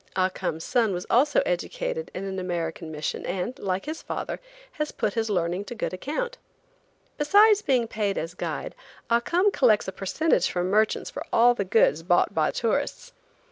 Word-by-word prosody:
Ah 185 0 +2
Cum's 170 -4 -4
son 230 -5 +1
was 180 - -4
also 290 - +4
educated - - -2
in 185 - -4
an 190 -1 -4
American 170 -2 -3
mission, 150 -1 -3
and, 190 +9 -3
like 190 -1 -2
his 310 +2 -5
father, - - -4 0.3
has 300 -1 -3
put 205 - -1
his 225 -1 -1
learning 180 -1 0
to 240 - -7
good 225 - -3
account. 470 - -4 0.8
Besides 410 +7 +6
being 255 - +1
paid 210 -3 -1
as 165 +2 -3
guide, - - -4 0.4
Ah 235 - +5
Cum 360 +11 +2
collects 230 - +3
a - - -2
percentage 315 - +1
from 180 +1 -1
merchants 215 +1 +1
for - - -5
all 240 +1 +6
the 220 - -2
goods 185 -5 +3
bought 175 +1 +2
by 155 -1 +2
tourists. 280 +5 -2
215 Hz, 180 wpm, -26 LUFS, 185-290 Hz, 0.8 s, Besides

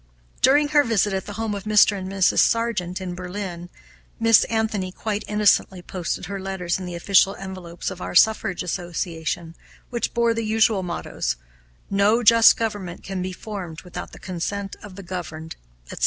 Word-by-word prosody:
During 290 +2 +4
her 295 -1 +5
visit 210 -4 +1
at 190 -1 -3
the 205 - -6
home 225 -2 -2
of 200 -1 -6
Mr. 210 -1 +5
and 190 -1 -5
Mrs. 195 -2 +3
Sargent, 230 -6 +1
in 185 -2 -5
Berlin, 180 -1 -6 0.5
Miss 225 -1 +5
Anthony 220 -4 -1
quite 210 +2 -3
innocently 205 -3 +2
posted 175 -2 -4
her 200 0 -5
letters 190 -2 -2
in 185 - -6
the 175 - -5
official 195 +2 +3
envelopes 185 -2 -6
of 185 -1 -9
our - - -5
Suffrage 195 -2 +3
Association, 170 -2 -3 0.4
which 235 0 -2
bore 235 -1 +3
the 230 0 -2
usual 220 -2 +2
mottoes, 175 - -3 0.6
"No 205 +4 +3
just 230 0 +7
government 205 -6 -4
can 190 -1 -4
be 185 +1 -3
formed 180 -5 -7
without 180 -1 -7
the - - -12
consent 195 +2 -4
of 205 -3 -11
the 200 - -9
governed," 160 -3 -6 0.4
etc. - - -7
195 Hz, 170 wpm, -23 LUFS, 180-215 Hz, 0.6 s, just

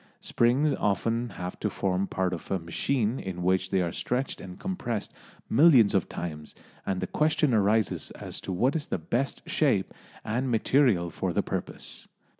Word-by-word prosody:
Springs 130 +6 +2
often 115 +4 0
have 90 -2 -6
to 105 - 0
form 95 0 -1
part 95 -1 -1
of 85 - -7
a 95 - +1
machine 110 +8 -1
in 90 -2 -5
which 95 +1 +2
they 95 -2 +2
are 85 - -2
stretched 125 +8 -2
and 90 -1 -9
compressed 130 - -3 0.3
millions 135 -9 +6
of 95 - +1
times, 75 -3 -6 0.3
and 95 -1 -1
the - - 0
question 150 -3 +2
arises 110 0 +2
as - - -6
to - - -5
what 125 - +1
is 155 -3 -2
the - - -1
best 120 +12 -2
shape 125 -11 +1 0.3
and 125 +5 -1
material 115 -6 +3
for - - -2
the - - +1
purpose. - - -5
105 Hz, 170 wpm, -28 LUFS, 90-130 Hz, 0.3 s, millions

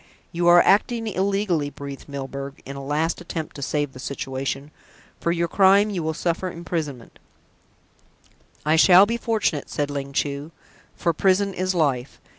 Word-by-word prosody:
"You 175 +1 0
are 175 0 +8
acting 225 +3 +2
illegally," 195 -6 0
breathed 140 0 -9
Milburgh, 140 0 -6
in 140 - -7
a 140 - -7
last 155 +5 -1
attempt 165 -2 -6
to 140 - -8
save 145 0 -1
the 130 - -11
situation. 135 +1 -4 0.5
"For 170 - 0
your 170 0 0
crime 200 +3 +4
you 185 -4 -2
will 160 0 -2
suffer 170 +2 -1
imprisonment" 160 -8 -5 1.5
"I 155 +1 +3
shall 185 +3 +8
be 230 +3 -2
fortunate," 220 -10 -1
said 145 -1 -2
Ling 140 -1 -4
Chu; 145 +2 -2 0.4
"for 170 - 0
prison 195 +3 +2
is 185 0 -1
life. 140 -6 0
160 Hz, 155 wpm, -23 LUFS, 140-185 Hz, 1.5 s, are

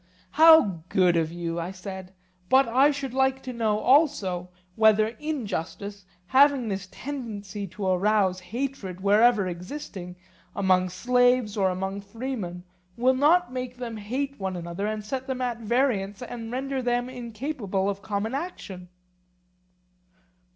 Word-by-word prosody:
How 310 - +6
good 180 -2 +3
of 165 -1 +1
you, 170 0 -4
I 170 +1 -3
said; 190 0 -8 0.4
but 265 0 +5
I 260 +5 +4
should 275 -3 -3
like 265 0 +1
to 255 - -5
know 220 -3 +1
also 215 - +2 0.3
whether 220 0 +4
injustice, 210 - -5 0.2
having 270 +2 +4
this 195 -1 -4
tendency 210 -8 -6
to 195 +2 -6
arouse 190 0 +2
hatred, 195 -1 -5
wherever 210 +1 +4
existing, 180 0 -7 0.4
among 185 -2 +2
slaves 245 +2 +2
or 195 -3 +2
among 190 +2 -3
freemen, 200 -4 -5 0.3
will 255 +2 +4
not 300 +3 +3
make 250 -1 -5
them 240 -2 -5
hate 265 +6 -4
one 190 -1 -3
another 175 +3 -4
and 215 -1 -4
set 260 +4 -4
them 260 -1 -3
at 245 -2 -2
variance 225 -3 0
and 235 -2 -7
render 265 +1 -2
them 245 0 0
incapable 235 -5 -3
of 200 0 -2
common 205 +3 -3
action? 200 - -6
215 Hz, 135 wpm, -26 LUFS, 190-255 Hz, 0.4 s, How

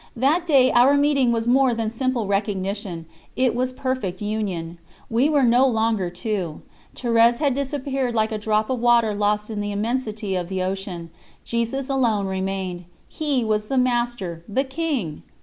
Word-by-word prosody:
That 300 +8 +1
day 270 -5 +5
our 255 +4 +5
meeting 285 -4 +3
was 230 0 -1
more 255 0 +4
than 225 -1 -2
simple 250 -1 -1
recognition, 195 -3 -2 0.3
it 255 -1 +2
was 255 +2 -1
perfect 255 -8 -3
union. 190 -6 -3 0.3
We 245 +6 +3
were 290 -3 +3
no 245 +2 +5
longer 220 -6 +1
two. 180 -2 -4 0.3
Thérèse 235 -1 +3
had 280 -1 +1
disappeared 270 -2 -2
like 220 0 +1
a 215 - -2
drop 215 +2 0
of 255 - -1
water 235 -2 +3
lost 210 +1 0
in 210 -1 -3
the 205 0 -3
immensity 215 -2 -2
of 180 -1 -3
the 190 -1 -2
ocean; 185 -3 -5 0.3
Jesus 235 +3 -2
alone 235 -7 +1
remained 190 -2 -3 0.2
He 290 -6 -1
was 215 -1 0
the 270 - -1
Master, 240 -9 0
the 260 +7 +1
King! 265 - -3
230 Hz, 165 wpm, -23 LUFS, 200-255 Hz, 0.3 s, day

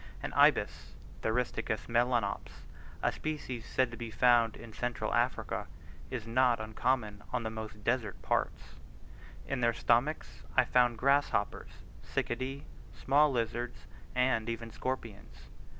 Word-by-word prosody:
An - - -4
ibis - - +3 0.3
(Theristicus 110 -2 -1
melanops 120 -3 0 0.4
a - - +3
species 145 -7 -4
said 130 -2 +1
to 120 - -8
be 120 0 -5
found 120 0 +4
in 115 -2 -11
central 120 +2 -2
Africa) - - 0 0.4
is 120 -4 -4
not 120 0 +3
uncommon 110 -1 -1
on 125 -2 -1
the 110 - -3
most 110 -1 -7
desert 115 -3 0
parts: - - -1 0.7
in 130 - -2
their 115 0 +3
stomachs 120 +6 +1 0.2
I 130 - +7
found 120 -1 +3
grasshoppers, 140 -5 +1 0.2
cicadae, 130 +3 -3 0.3
small 145 +2 +4
lizards, 120 0 -2 0.3
and 125 -3 +2
even 115 0 -4
scorpions. 115 -4 -6
120 Hz, 125 wpm, -32 LUFS, 110-130 Hz, 0.7 s, I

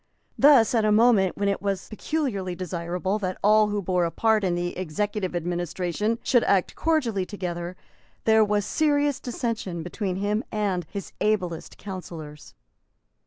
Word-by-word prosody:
Thus, 270 -6 +6
at 225 -2 +3
a 215 - +3
moment 215 -3 +5
at - - -37
which 200 0 +1
it 200 - -1
was 195 -2 -2
peculiarly 215 - -2
desirable 180 +2 -2
that 185 -2 -3
all 215 +1 +5
who 205 -1 -2
bore 180 -1 +1
a - - 0
part 220 +3 +2
in 180 -2 +1
the 175 0 -2
executive 185 +2 -2
administration 175 +5 -1
should 245 -3 +3
act 190 -3 +2
cordially 260 - 0
together, 180 -2 -5 0.5
there 220 0 +5
was 205 -1 +1
serious 290 0 +1
dissension 225 -8 -3
between 185 +2 -3
him 205 +4 -1
and 195 -6 -1
his 200 -1 -6
ablest 185 -6 -1
councillors. 165 -6 -9
200 Hz, 155 wpm, -25 LUFS, 180-215 Hz, 0.5 s, Thus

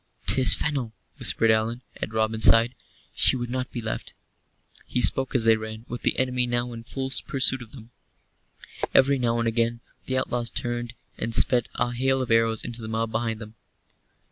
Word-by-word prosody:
"'Tis 130 -1 +6
Fennel," 135 -7 -3 0.3
whispered 115 -1 +3
Allan, 115 +3 -1
at - - -5
Robin's 110 0 +1
side. 115 +2 +5 0.4
"She - - +4
would 120 -1 -5
not 130 0 -3
be 120 - -6
left." 110 - -6 0.7
He - - -2
spoke 135 +2 +4
as 120 - +3
they 115 0 +5
ran, 110 +1 -8
with 120 - -7
the - - 0
enemy 125 -1 0
now 120 0 -2
in 115 - -8
full 135 +2 -5 0.2
pursuit 130 -1 +2
of 115 -2 -12
them. 120 -3 -13 1.0
Every 135 0 +4
now 120 -1 0
and 115 0 -1
again 115 +1 -1 0.3
the 130 - -1
outlaws 120 -2 -2
turned 120 -1 -4 0.2
and 115 0 -1
sped 125 -2 +3
a 120 - -1
hail 135 +2 0
of 130 -3 -3
arrows 115 -1 +2
into 120 0 -6
the 110 - -7
mob 110 0 -3
behind 115 0 -2
them. 110 -1 -10
120 Hz, 185 wpm, -24 LUFS, 115-125 Hz, 1.0 s, Tis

